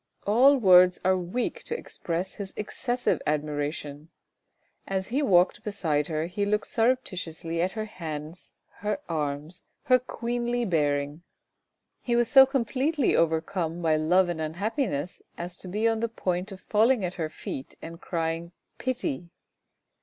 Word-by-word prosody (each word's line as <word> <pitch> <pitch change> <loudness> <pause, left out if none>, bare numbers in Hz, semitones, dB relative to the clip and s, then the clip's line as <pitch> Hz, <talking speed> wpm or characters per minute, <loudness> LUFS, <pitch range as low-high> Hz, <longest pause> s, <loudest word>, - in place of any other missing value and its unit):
All 255 +7 +6
words 180 -5 +6
are 185 0 +4
weak 185 +7 -2
to 470 - -2
express 180 - -4
his 200 -2 -7
excessive 245 +4 -1
admiration. 150 0 -2 0.8
As 190 -1 -2
he 265 +5 +1
walked 180 -9 +3
beside 160 -8 -1
her 155 -1 -1
he 180 +4 -2
looked 210 +1 +1
surreptitiously 180 -9 -1
at 185 +2 0
her 215 -1 -3
hands, 160 -4 -7 0.2
her 210 +6 -2
arms, 150 +1 -3 0.2
her 255 -1 +5
queenly 240 0 -2
bearing. 145 -3 0 0.8
He 240 - 0
was 240 -1 +3
so 270 -1 +8
completely 270 +2 +1
overcome 165 +1 0
by 160 -1 +3
love 175 +4 +3
and 170 -2 -3
un 155 0 -3
happiness 200 - -2 0.2
as 175 +1 -5
to - - -8
be 210 +5 0
on 225 -1 +1
the 230 +1 -1
point 185 -2 -2
of 190 -1 -9
falling 220 +1 +3
at 180 - -3
her 155 - -1
feet 135 -3 -7
and 165 +1 -9
crying 165 0 -3
" - - -49
pity." 210 - -3
185 Hz, 150 wpm, -27 LUFS, 160-230 Hz, 0.8 s, so